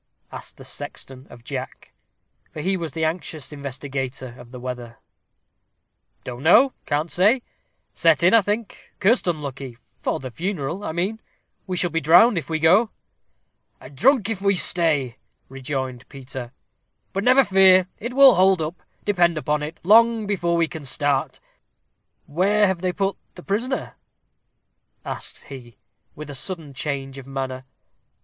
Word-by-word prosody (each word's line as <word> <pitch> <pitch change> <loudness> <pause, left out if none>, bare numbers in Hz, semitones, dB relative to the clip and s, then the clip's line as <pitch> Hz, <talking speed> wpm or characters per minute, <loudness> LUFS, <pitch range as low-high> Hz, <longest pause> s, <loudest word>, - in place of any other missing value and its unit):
asked - - -10
the - - -12
sexton 130 0 -8
of 120 - -14
Jack, 130 0 -7 0.6
for - - -8
he 190 +5 0
was 170 -4 -5
the 160 -1 -1
anxious 160 -3 -4
investigator 135 -2 -5
of 120 - -13
the 125 0 -10
weather. 120 -2 -7 1.3
"Don't 125 0 -7
know 245 - +5
can't 155 +2 -1
say 215 +8 +3 0.5
set 165 0 +3
in, 185 - +5
I 230 - +7
think 205 +2 -5
cursed 210 +2 +2
unlucky 140 -6 -4 0.2
for - - -2
the 130 -1 -7
funeral, 175 - -4
I - - -3
mean 190 +7 -2 0.5
we 185 -1 -3
shall 175 -1 0
be 165 - -1
drowned 175 - +6
if 145 - -10
we 160 - 0
go." 185 +8 +4 0.9
"And 135 +2 -13
drunk 250 - +3
if 220 -4 -3
we 200 0 +2
stay," 155 -9 +2 0.3
rejoined 130 -1 -5
Peter. 130 -3 -8 0.6
"But 195 - -2
never 255 +3 +6
fear, 190 -2 +5
it 240 +3 -5
will 275 -2 +8
hold 190 0 +4
up, 160 +2 -4 0.2
depend 175 -5 +2
upon 150 0 -1
it, 155 +2 -6
long 225 +3 +5
before 175 -4 0
we 165 -1 +2
can 160 -1 -8
start. 140 0 -1 0.9
Where 200 +7 +2
have 190 -3 -1
they 185 -1 0
put 195 +1 -2 0.2
the 180 - -11
prisoner?" 240 +7 -2 1.1
asked - - -6
he, 120 -5 -12 0.4
with 150 -1 -8
a - - -7
sudden 150 +1 -4
change 135 -1 -4
of 135 - -12
manner. 130 -1 -5
165 Hz, 155 wpm, -22 LUFS, 135-195 Hz, 1.3 s, will